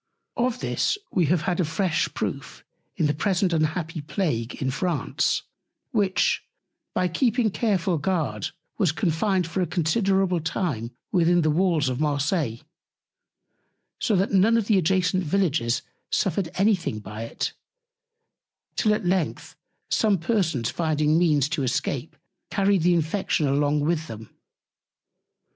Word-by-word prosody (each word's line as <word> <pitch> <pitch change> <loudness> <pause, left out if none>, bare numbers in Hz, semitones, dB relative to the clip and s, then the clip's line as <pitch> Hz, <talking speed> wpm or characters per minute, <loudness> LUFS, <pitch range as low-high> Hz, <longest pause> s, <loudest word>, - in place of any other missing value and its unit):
Of 250 0 0
this - - 0
we 175 -5 +2
have 170 0 +2
had 180 -2 -1
a - - +3
fresh 165 +1 0
Proof - - -5 0.3
in - - +1
the 150 - +2
present 185 +2 +1
unhappy 160 0 -1
Plague 145 - -2
in 130 -1 -2
France, 175 +6 0 0.5
which, 205 -5 +1 0.5
by 180 - +2
keeping 230 +4 +1
careful 190 -6 0
Guard, 145 - -1 0.3
was 180 -6 +3
confined 180 +2 0
for 170 +3 -2
a 180 - 0
considerable 185 +2 +1
Time 155 - -2 0.2
within 175 -1 +3
the 155 - +3
Walls 165 -3 +2
of 130 0 -2
Marseilles; 145 - 0 1.4
so 220 - +1
that 190 +1 +1
none 205 +4 +4
of 225 - 0
the 210 -2 +3
adjacent 185 +1 +1
Villages 150 -9 +1 0.3
suffered 185 -2 0
any 205 +3 +4
thing 165 - -4
by 105 +1 -7
it; - - -3 1.2
till 215 -2 +3
at 210 - -5
length 180 -2 -1 0.4
some 210 -3 +3
Persons 165 - 0
finding 155 -1 +1
Means 150 -5 +3
to 155 -2 -1
escape 130 - -2 0.3
carried 195 -2 +2
the 175 +1 +4
Infection 165 -1 0
along 145 +2 +2
with 160 +1 0
them. 110 -4 -10
170 Hz, 135 wpm, -25 LUFS, 150-195 Hz, 1.4 s, none